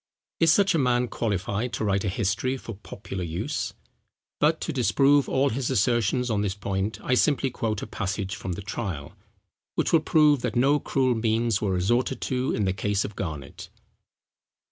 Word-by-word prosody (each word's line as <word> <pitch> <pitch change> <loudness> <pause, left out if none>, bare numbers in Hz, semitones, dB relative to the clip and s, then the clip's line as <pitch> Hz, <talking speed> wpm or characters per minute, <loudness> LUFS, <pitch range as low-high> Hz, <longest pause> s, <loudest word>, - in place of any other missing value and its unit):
Is 165 -1 +5
such 200 +3 +4
a 165 - +2
man 125 -2 +2
qualified 105 +2 -2
to - - -2
write 100 -1 +1
a 100 - 0
history 115 +6 -1
for 115 - -8
popular 95 -1 -7
use? 95 - -3 0.6
But 155 +2 +3
to 160 - -3
disprove 140 +2 +3
all 135 +1 +2
his 125 +2 -2
assertions 120 +1 +1
on 105 -1 +1
this 100 -2 -1
point, 100 +2 -2
I - - +1
simply 135 0 +2
quote 110 -4 -2
a - - -3
passage 95 -1 -3
from 95 - -4
the 100 - -7
Trial, 95 -9 -5 0.6
which - - 0
will 165 - +7
prove 150 -3 +4
that 125 -2 -2
no 140 +4 +4
cruel 130 -3 +1
means 115 -1 +1
were 105 - 0
resorted 120 +9 +1
to 130 0 -1
in 105 - 0
the 95 - +1
case 105 +1 0
of 105 - -7
Garnet. 75 -7 -6
115 Hz, 180 wpm, -26 LUFS, 100-130 Hz, 0.6 s, will